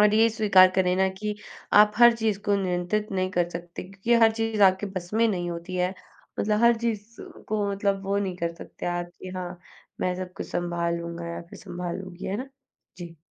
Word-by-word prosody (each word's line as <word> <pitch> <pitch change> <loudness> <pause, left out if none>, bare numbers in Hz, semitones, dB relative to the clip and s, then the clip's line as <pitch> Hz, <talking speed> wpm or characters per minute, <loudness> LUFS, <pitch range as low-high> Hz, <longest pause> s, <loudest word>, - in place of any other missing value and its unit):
और 210 0 +5
ये 225 +1 +5
स्वीकार 200 -4 +6
करें 180 -1 +3
ना 190 0 +3
कि 210 0 -2 0.5
आप 210 0 +5
हर 240 0 +8
चीज़ 220 -3 0
को 205 - +3
नियंत्रित 185 +3 -1
नहीं 185 0 0
कर 175 -2 +1
सकते 170 0 -7
क्योंकि 195 +5 -1
हर 225 0 +6
चीज़ 225 -2 -1
आपके 190 +1 +4
बस 175 -1 -5
में 230 +1 +4
नहीं 175 -4 -2
होती 170 +2 -5
है, 180 +1 0 0.5
मतलब 210 +1 +1
हर 235 -1 +6
चीज़ 230 -1 -3 0.3
को 210 -1 0
मतलब 200 0 -1
वो 200 +1 0
नहीं 190 -3 -2
कर 170 -1 -2
सकते - - -9
आप 175 0 -2
कि 185 - -7
हाँ, 180 -1 -5 0.4
मैं 180 0 0
सब 185 0 -6
कुछ - - -5
सँभाल 170 -1 -1
लूँगा 170 0 -6
या 170 - -5
फिर - - -11
सँभाल 180 -3 -5
लूँगी, 185 -1 -9
है 195 - -2
ना। 260 +3 -6 0.5
जी। 170 -1 -9
190 Hz, 210 wpm, -26 LUFS, 175-210 Hz, 0.5 s, हर